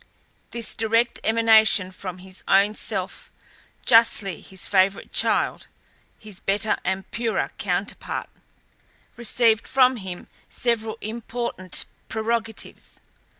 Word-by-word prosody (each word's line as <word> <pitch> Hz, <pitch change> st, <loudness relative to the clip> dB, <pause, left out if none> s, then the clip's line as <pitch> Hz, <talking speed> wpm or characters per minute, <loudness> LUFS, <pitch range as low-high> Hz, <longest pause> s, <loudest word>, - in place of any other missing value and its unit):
This 230 Hz, -2 st, -4 dB
direct 230 Hz, +2 st, +1 dB
emanation 220 Hz, -4 st, +4 dB
from 185 Hz, -1 st, -7 dB
his 185 Hz, 0 st, -12 dB
own 200 Hz, +2 st, +4 dB
self, -, -, -4 dB, 0.5 s
justly 225 Hz, -6 st, +4 dB
his 190 Hz, 0 st, -4 dB
favourite 195 Hz, 0 st, +1 dB
child, -, -, +2 dB, 0.5 s
his 210 Hz, -4 st, -9 dB
better 210 Hz, +2 st, 0 dB
and 190 Hz, 0 st, -2 dB
purer 230 Hz, -1 st, -1 dB
counterpart, -, -, -3 dB, 0.9 s
received 230 Hz, -2 st, +2 dB
from 255 Hz, -1 st, +4 dB
him 190 Hz, -4 st, -8 dB, 0.2 s
several 225 Hz, -2 st, -1 dB
important 225 Hz, -4 st, -3 dB, 0.2 s
prerogatives. 225 Hz, 0 st, -3 dB
220 Hz, 100 wpm, -23 LUFS, 195-230 Hz, 0.9 s, emanation